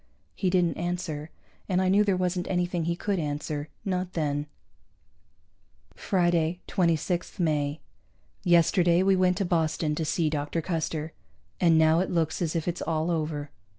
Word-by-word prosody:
He 190 - 0
didn't 180 -2 +2
answer, 170 -3 -3 0.4
and 180 -1 +2
I 185 - +2
knew 200 +3 +4
there 195 -3 +1
wasn't 180 0 -1
anything 175 -2 -1
he 170 +1 0
could 195 +1 -1
answer. 150 0 -3 0.2
Not 185 -1 -2
then. 145 -2 -1 1.5
Friday, 175 -3 +1
26 175 0 0
May. 150 -3 0 0.6
Yesterday 175 0 +4
we 195 0 +4
went 185 -1 +2
to 195 - 0
Boston 160 -2 0
to 160 - -2
see 160 +1 0
Dr. 150 +1 -2
Custer, 160 -2 -3 0.5
and 165 -2 +5
now 160 +1 +5
it 185 - 0
looks 165 -1 0
as 170 -1 -1
if 165 0 -2
it's 175 0 -2
all 160 +1 -1
over. 150 -3 -2
170 Hz, 150 wpm, -27 LUFS, 155-180 Hz, 1.5 s, and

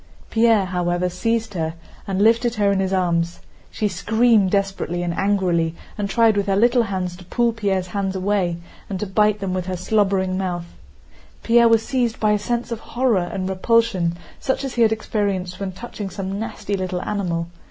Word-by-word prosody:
Pierre, 225 -3 +4
however, 180 0 0
seized 225 +4 -1
her 160 -2 -2 0.3
and 195 0 +1
lifted 230 +2 +3
her 205 -2 +2
in 195 - +1
his 190 -1 0
arms. 170 -2 0 0.3
She 215 - -1
screamed 215 +2 +3
desperately 195 -3 -1
and 175 -1 -1
angrily 180 -4 +1 0.2
and 205 -1 -3
tried 225 0 +4
with 200 0 0
her 195 - +2
little 240 +4 +4
hands 185 -5 -2
to 180 - -13
pull 235 +5 +1
Pierre's 195 -5 -1
hands 195 +1 -3
away 190 -3 0 0.3
and 190 -2 -3
to 210 - -2
bite 210 +1 +2
them 190 -2 -2
with 185 -1 -3
her 185 -1 -2
slobbering 190 -1 +1
mouth. 175 -2 -2 0.8
Pierre 235 0 +5
was 225 -1 +3
seized 245 -4 0
by 215 -1 +3
a 210 - +2
sense 240 +3 -2
of 230 - -3
horror 225 -8 0
and 185 -1 -3
repulsion 190 -3 +1 0.2
such 265 +1 -1
as 270 -2 -4
he 240 - 0
had 225 -1 +5
experienced 200 -4 -2
when 195 -1 -3
touching 205 0 -7
some 195 0 -4
nasty 215 -2 -3
little 185 -1 -3
animal. 170 -5 -2
195 Hz, 185 wpm, -21 LUFS, 185-220 Hz, 0.8 s, Pierre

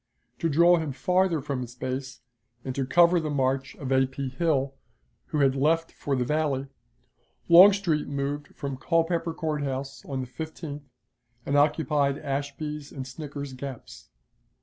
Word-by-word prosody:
To 165 - +1
draw 170 +4 +5
him 160 -4 -3
farther 180 +1 +1
from 140 -2 -3
his 125 -1 -7
base, 130 0 -5 0.4
and 130 - -3
to 135 0 -2
cover 175 +4 +5
the 155 -2 -3
march 135 -1 0
of 135 -2 -6
A. 130 0 +4
P. 135 0 -4
Hill, 140 -1 0 0.5
who 150 - 0
had 135 -1 +3
left 165 +4 +1
for 140 - -2
the 125 -1 0
Valley, 145 -1 0 0.8
Longstreet 180 -3 +6
moved 140 +1 -3
from 140 -2 -4
Culpeper 165 +3 +1
Court 155 -2 -2
House 135 -1 -4
on 135 -2 -3
the - - -4
15th, 150 +1 -7 0.6
and 140 - 0
occupied 145 -1 +2
Ashby's 145 +1 -4
and 135 -2 -6
Snicker's 140 0 -7
Gaps. 130 -2 -9
140 Hz, 150 wpm, -27 LUFS, 135-160 Hz, 0.8 s, Longstreet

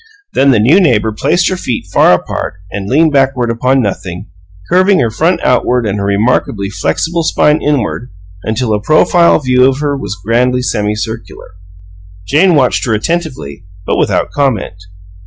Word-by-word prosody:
Then 140 - +3
the 130 - +4
new 135 - +4
neighbor 110 - +2
placed 170 - 0
her 185 - -2
feet 120 - -4
far - - +5
apart 90 - -3 0.2
and 100 0 -5
leaned 155 +4 +3
backward 135 -3 +1
upon 125 +3 +1
nothing, 90 -4 -5 0.4
curving 185 +2 +3
her 115 - 0
front 165 +11 0
outward 125 -1 +1
and 105 -1 -2
her 100 - -2
remarkably 100 -1 0
flexible 170 - -2
spine 150 -1 +1
inward 130 -4 -2 0.3
until 110 +2 -2
a 105 - -1
profile 160 +6 +3
view 125 -3 +1
of 135 0 +2
her 145 -1 -2
was 105 -7 -6
grandly 125 +3 +1
semicircular. 105 0 -4 0.8
Jane 170 - +3
watched 130 -4 +1
her 110 - +1
attentively, 125 - -4 0.2
but - - -1
without - - 0
comment. 115 -9 -2
125 Hz, 155 wpm, -12 LUFS, 105-150 Hz, 0.8 s, far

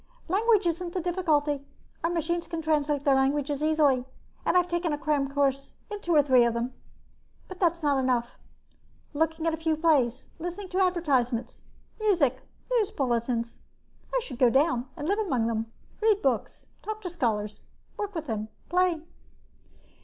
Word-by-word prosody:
"Language 420 +3 +3
isn't 345 +1 -1
the - - +1
difficulty. 310 -5 0 0.4
Our 335 - +2
machines 340 0 -1
translate 305 -3 0
their 280 - +4
languages 280 +2 +1
easily 300 -5 +3 0.4
and - - +3
I've 360 -1 +3
taken 345 -1 -1
a - - -1
cram 295 -3 0
course 275 -1 0
in 415 -1 -5
two 345 -4 +1
or 295 - +6
three 260 -3 +5
of 235 -1 +1
them. 240 +2 -2 0.7
But 370 - -10
that's 340 -2 +1
not 285 -2 +3
enough, 250 -2 0 0.7
looking 320 +2 0
at 330 - +2
a - - -2
few 320 -1 0
plays, 275 -7 +2
listening 355 +3 -5
to 370 - -1
advertisements, 265 -10 0 0.4
music, 340 - +2 0.3
and - - +4
news 420 - +1
bulletins. 235 -2 -1 0.5
I - - +2
should 260 - -8
go 250 -3 +6
down 265 -1 +2
and 295 - -4
live 405 +4 +1
among 265 - 0
them, 225 0 -2 0.3
read 430 -2 +3
books, 255 -5 -1 0.2
talk 435 0 -5
to 360 - -3
scholars, 215 -9 -1 0.3
work 410 -2 -4
with 325 -1 -3
them, 215 -4 -3 0.2
play." 355 -2 +2
305 Hz, 165 wpm, -27 LUFS, 260-350 Hz, 0.7 s, or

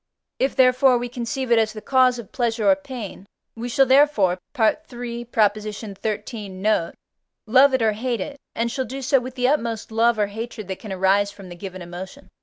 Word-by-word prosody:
If, 270 - +1
therefore, 255 0 +5
we 240 0 -4
conceive 245 +1 -4
it 235 - +6
as 215 -1 +1
the 215 - -7
cause 255 +1 +3
of 235 -5 -9
pleasure 230 -3 0
or - - +5
pain, 255 -9 -8 0.3
we 235 +2 -5
shall 270 +3 +4
therefore 260 -9 +4 0.2
(III. 240 -1 -1
xiii. 215 0 -2
note) 190 -2 0 0.5
love 265 +4 +5
it 255 - 0
or 220 - +4
hate 235 +2 -2
it, 285 +7 -6 0.2
and 235 +1 -1
shall 260 +1 -2
do 270 +2 -6
so 270 +1 +3
with 255 +1 -8
the 250 -1 +1
utmost 230 -7 -1
love 230 +1 +3
or 210 - +2
hatred 215 0 -7
that 190 - -4
can 215 - -8
arise 190 +2 +2
from 195 -3 -12
the 175 - -9
given 185 0 -8
emotion. 185 +10 -9
230 Hz, 195 wpm, -23 LUFS, 205-255 Hz, 0.5 s, it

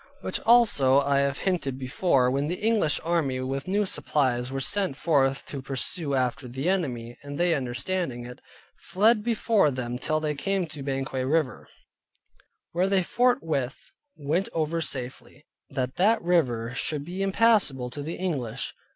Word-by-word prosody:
Which - - -3
also 205 - +5
I 140 0 +2
have 140 0 0
hinted 165 -9 -1
before, 130 -1 +1
when 140 +2 0
the 175 - -1
English 215 -8 +2
army 160 -6 0
with 135 +3 -3
new 205 +2 +1
supplies 130 -8 0
were 135 - -2
sent 185 +1 0
forth 135 -5 +1
to 140 - -6
pursue 140 +3 -1
after 130 +1 -1
the 130 +6 -4
enemy, 125 -11 -2
and 145 0 -7
they 175 -1 +3
understanding 130 0 -2
it, 125 0 -10 0.4
fled 215 +3 +2
before 225 -6 +2
them 125 -2 -4
till 155 +2 0
they 155 -1 -1
came 190 +5 -1
to 155 -3 -9
Banquang 135 -1 -2
river, 155 -4 0 1.0
where 180 +3 +1
they 195 -2 +3
forthwith 165 - 0 0.2
went 160 +6 -1
over 165 +1 -1
safely; 130 +1 -4 0.2
that 130 -2 -3
that 215 +5 +4
river 125 -10 +1
should 145 +2 -1
be 180 +3 -5
impassable 195 - +2
to 145 - -5
the 160 +4 -4
English. 140 -12 -3
145 Hz, 155 wpm, -26 LUFS, 130-180 Hz, 1.0 s, also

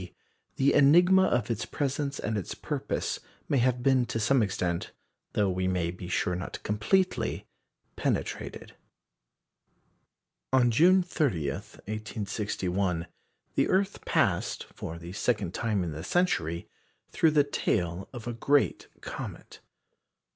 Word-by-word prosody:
D., 90 - -10 0.4
the 135 +1 +3
enigma 175 +7 +6
of 120 -1 0
its 115 - -1
presence 140 0 -2
and 110 - -2
its 100 -5 -3
purpose - - -2 0.3
may 140 - +2
have 125 0 +1
been 130 -2 +3
to 115 - -2
some 125 +4 +3
extent 90 -4 -1 0.4
though 105 - +2
we 95 0 0
may 90 -2 0
be 90 0 -8
sure 90 0 0
not 90 - -5
completely 110 - +1 0.5
penetrated. - - -3 1.8
On 125 -2 +4
June 180 +9 +5
30, 115 - 0
1861, 100 - -3 0.5
the - - +2
earth 195 +1 +1
passed, - - +1
for 80 - -6
the 85 +2 -9
second 105 -4 0
time 105 -5 0
in 85 - -3
the 75 +1 -6
century, 85 - 0 0.4
through 160 - +4
the 150 -1 +4
tail 90 -10 -1
of 120 -4 -8
a 120 - -3
great 140 +4 +1
comet. - - -7
110 Hz, 130 wpm, -28 LUFS, 90-140 Hz, 1.8 s, enigma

